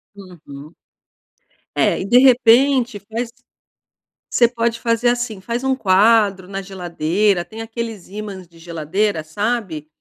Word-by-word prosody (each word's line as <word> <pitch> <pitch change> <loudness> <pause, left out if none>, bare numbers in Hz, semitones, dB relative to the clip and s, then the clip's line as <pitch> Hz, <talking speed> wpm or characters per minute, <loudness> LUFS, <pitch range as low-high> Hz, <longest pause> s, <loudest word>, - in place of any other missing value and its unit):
Uhum. 160 -6 -13 1.0
É. - - +2
E, - - -4
de 240 +5 +5
repente, 250 -2 +4
faz 225 +4 -5 1.0
Você 235 - +4
pode 230 -1 -2
fazer 230 0 +1
assim. 240 -4 -2
Faz 235 +6 -4
um 265 0 +1
quadro 200 -3 +3
na 195 0 -5
geladeira 180 0 -1
tem 225 0 -9
aqueles 225 -3 -6
ímãs 200 -2 -8
de 165 0 -21
geladeira, 165 +3 -2
sabe? 190 -2 -3
210 Hz, 125 wpm, -19 LUFS, 180-235 Hz, 1.0 s, de